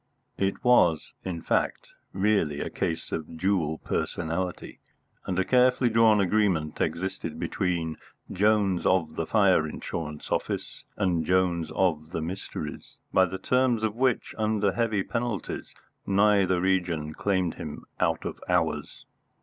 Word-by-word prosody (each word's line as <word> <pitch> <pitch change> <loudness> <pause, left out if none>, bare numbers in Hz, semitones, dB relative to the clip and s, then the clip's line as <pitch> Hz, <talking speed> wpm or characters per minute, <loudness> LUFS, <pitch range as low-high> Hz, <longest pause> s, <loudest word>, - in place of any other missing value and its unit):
It 95 +5 -1
was, 90 -11 +4
in 85 -3 -4
fact, - - 0 0.2
really 95 -7 +1
a - - -3
case 85 -3 -3
of 80 0 -5
dual 85 -4 +1
personality; 85 +3 -3 0.5
and 90 - -1
a 95 - +2
carefully 125 -1 +4
drawn 110 -1 +5
agreement 95 -6 +1
existed 95 +3 -2
between 85 -4 -1 0.3
Jones 100 -2 +2
of 85 -4 +1
the 80 - -2
fire 95 -7 +4
insurance 75 0 -6
office - - -3
and 90 -5 +1
Jones 90 -1 +1
of 80 -4 +1
the - - -2
mysteries, 90 +4 -6 0.2
by 95 - +6
the 95 +1 -5
terms 125 +2 +1
of 110 -1 0
which, 125 -1 0
under 105 -2 +1
heavy 110 -1 0
penalties, 115 -5 -4 0.3
neither 100 -2 +3
region 85 -5 0
claimed 95 -3 0
him - - -8
out - - 0
of - - -5
hours. - - -1
95 Hz, 135 wpm, -27 LUFS, 85-105 Hz, 0.5 s, by